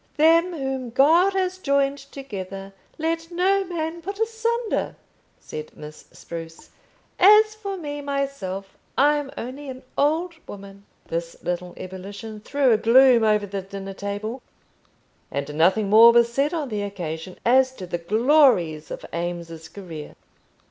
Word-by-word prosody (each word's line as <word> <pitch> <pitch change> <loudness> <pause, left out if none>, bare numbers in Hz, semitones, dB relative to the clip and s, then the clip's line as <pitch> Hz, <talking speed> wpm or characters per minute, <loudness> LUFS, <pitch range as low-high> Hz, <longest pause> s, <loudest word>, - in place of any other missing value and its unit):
"Them 330 +3 +4
whom 265 -4 -3
God 325 +10 +4
has 370 -1 -1
joined 280 -3 +1
together, 195 -8 -8 0.2
let 330 +1 -2
no 380 +3 +2
man 340 -2 -4
put 395 +4 -6
asunder," 455 +1 -1 0.4
said 155 0 -9
Miss 150 0 -11
Spruce. 165 -1 -9 0.5
"As 425 +3 +7
for 400 -3 -6
me 290 -4 -5
myself, 275 -10 -4 0.2
I'm 290 0 +3
only 270 +4 -6
an 260 0 -8
old 320 +5 +1
woman." 200 0 -11 0.2
This 170 0 -4
little 180 0 -3
ebullition 200 +4 -8
threw 270 +4 +1
a 220 - +5
gloom 240 +1 +6
over 210 -1 +3
the 200 0 -4
dinner 195 0 -8
table, 205 +5 -5 0.9
and 140 +1 -4
nothing 185 +7 +3
more 225 +3 +8
was 235 0 +3
said 280 +4 +1
on 315 -6 -3
the 210 -2 -3
occasion 180 -3 -6
as 260 +2 +4
to 190 - -8
the 175 -1 -4
glories 210 - +3
of - - -7
Eames's 170 -2 -5
career. 165 -5 -9
235 Hz, 140 wpm, -23 LUFS, 190-305 Hz, 0.9 s, more